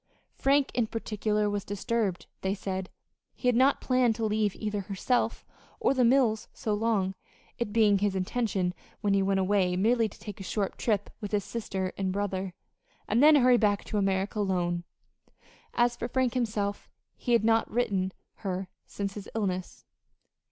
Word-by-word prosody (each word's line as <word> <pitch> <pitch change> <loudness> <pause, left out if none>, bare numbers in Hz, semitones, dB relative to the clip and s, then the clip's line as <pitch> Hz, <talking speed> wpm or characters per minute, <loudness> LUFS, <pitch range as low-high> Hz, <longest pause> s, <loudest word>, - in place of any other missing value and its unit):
Frank, 275 0 +2
in 240 -3 +1
particular, 210 -1 -1
was 205 -1 -1
disturbed, 205 -3 -1 0.2
they 190 +1 0
said. 190 -2 -4 0.5
He 250 - -3
had 250 - +4
not 265 +3 +4
planned 255 -3 +2
to 225 - -1
leave 210 -2 +1
either 210 -2 -2
herself 200 +6 -1 0.3
or - - +3
the 260 -2 +2
mills 235 -3 +3
so 215 - -2
long, 205 -3 +1 0.5
it 235 -3 -2
being 210 -3 +4
his 200 -1 +1
intention 190 -2 0 0.3
when 205 -2 +2
he 195 - +3
went 195 0 +2
away 190 -1 +2
merely 225 +4 +2
to - - -15
take 205 -2 -8
a - - -6
short 195 +1 -2
trip 205 -3 0
with 205 - -5
his 205 -1 +2
sister 190 -4 -3
and 190 -1 0
brother, 190 -2 -2 0.5
and 225 +4 +2
then 305 +1 +8
hurry 250 -3 +6
back 205 -3 +2
to 210 - -1
America 195 +1 0
alone. 175 -3 0 0.9
As 240 0 +3
for 235 - -4
Frank 255 -1 +1
himself 210 -5 -2 0.3
he 245 - -1
had 230 - +4
not 225 0 +3
written 195 -6 0 0.3
her 190 -2 -3 0.2
since 200 -1 -4
his 205 -1 -8
illness. 185 -4 -3
205 Hz, 170 wpm, -29 LUFS, 195-230 Hz, 0.9 s, then